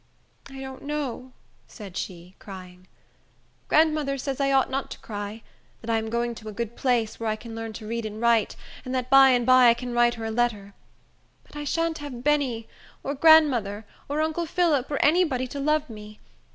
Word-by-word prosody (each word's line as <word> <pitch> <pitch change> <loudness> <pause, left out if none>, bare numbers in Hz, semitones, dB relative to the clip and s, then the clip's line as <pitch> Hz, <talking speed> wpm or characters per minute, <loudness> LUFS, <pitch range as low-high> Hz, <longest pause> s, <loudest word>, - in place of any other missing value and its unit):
"I 270 0 -10
don't 265 -1 -8
know," 280 -3 -4 0.4
said 200 -5 -11
she, 180 -1 -7
crying. 185 -2 -11 0.8
"Grandmother 305 -3 +2
says 270 +1 -3
I 275 0 +2
ought 265 -1 +2
not 270 +1 -2
to - - -8
cry; 205 +1 -7 0.4
that 230 - -4
I 225 - +2
am 220 0 -5
going 235 +1 -1
to 220 -1 -9
a - - -6
good 235 +2 -5
place, 240 -4 0
where 225 -1 -2
I 215 - 0
can 225 +1 -10
learn 225 0 -5
to 215 - -9
read 230 0 -3
and 215 0 -8
write, 235 -2 +2 0.3
and 255 0 -4
that 255 0 -3
by 270 0 +8
and 245 -2 +2
by 255 0 +7
I 235 - +6
can 245 0 -6
write 240 0 +3
her 225 -1 -6
a 220 - -3
letter. 220 -4 -1 0.7
But - - -19
I 295 0 -5
shan't 330 +2 -1
have 265 -5 -7
Benny, 270 -6 0 0.4
or 280 - -2
grandmother, 265 -9 +4 0.2
or 295 +2 0
uncle 320 +2 -2
Phillip, 315 -6 +1
or 290 - -1
any 345 +5 +5
body 255 -6 -1
to 270 +3 -7
love 305 +1 +1
me. 210 -2 -11
245 Hz, 205 wpm, -25 LUFS, 220-280 Hz, 0.8 s, by